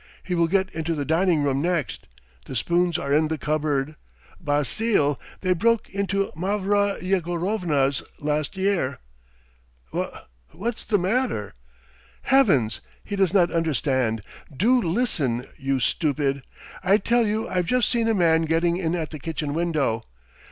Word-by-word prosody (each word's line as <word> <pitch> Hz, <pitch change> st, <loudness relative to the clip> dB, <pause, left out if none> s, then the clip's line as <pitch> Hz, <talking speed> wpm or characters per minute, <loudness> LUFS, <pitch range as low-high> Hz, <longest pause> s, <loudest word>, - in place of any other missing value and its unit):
He 185 Hz, -, -3 dB
will 170 Hz, -1 st, +3 dB
get 190 Hz, +2 st, 0 dB
into 160 Hz, +1 st, -2 dB
the 145 Hz, -2 st, -2 dB
dining 165 Hz, 0 st, +2 dB
room 140 Hz, -1 st, +1 dB
next... 170 Hz, -3 st, -2 dB, 0.4 s
the -, -, -7 dB
spoons 175 Hz, +5 st, +1 dB
are 140 Hz, 0 st, -2 dB
in 155 Hz, +1 st, +3 dB
the 160 Hz, 0 st, -2 dB
cupboard! 150 Hz, -1 st, -1 dB, 0.5 s
Basile! 145 Hz, -, +1 dB, 0.2 s
They 185 Hz, -1 st, +2 dB
broke 230 Hz, +5 st, +1 dB
into 200 Hz, 0 st, -1 dB
Mavra 200 Hz, +3 st, +1 dB
Yegorovna's 175 Hz, -6 st, 0 dB, 0.2 s
last 150 Hz, +4 st, -2 dB
year." 190 Hz, -9 st, 0 dB, 1.0 s
"Wha -, -, -3 dB, 0.3 s
what's 225 Hz, +6 st, -3 dB
the 205 Hz, -, +1 dB
matter?" 195 Hz, -, -1 dB, 0.7 s
"Heavens! 170 Hz, -, +3 dB, 0.2 s
he 205 Hz, -, -4 dB
does 195 Hz, -3 st, +2 dB
not 180 Hz, -4 st, +3 dB
understand. 130 Hz, -9 st, 0 dB, 0.3 s
Do 240 Hz, -, +3 dB
listen, 165 Hz, -, 0 dB
you 135 Hz, -1 st, -1 dB
stupid! 140 Hz, 0 st, 0 dB, 0.4 s
I 195 Hz, +2 st, +5 dB
tell 235 Hz, +2 st, +2 dB
you 215 Hz, +2 st, -1 dB
I've 180 Hz, -2 st, -1 dB
just 250 Hz, +2 st, +2 dB
seen 235 Hz, -2 st, +1 dB
a 225 Hz, -, +2 dB
man 165 Hz, -3 st, +3 dB
getting 165 Hz, +2 st, +1 dB
in 170 Hz, -2 st, -1 dB
at 160 Hz, -3 st, -3 dB
the 155 Hz, -, -7 dB
kitchen 150 Hz, -1 st, -3 dB
window! 155 Hz, -9 st, 0 dB
170 Hz, 145 wpm, -24 LUFS, 145-195 Hz, 1.0 s, I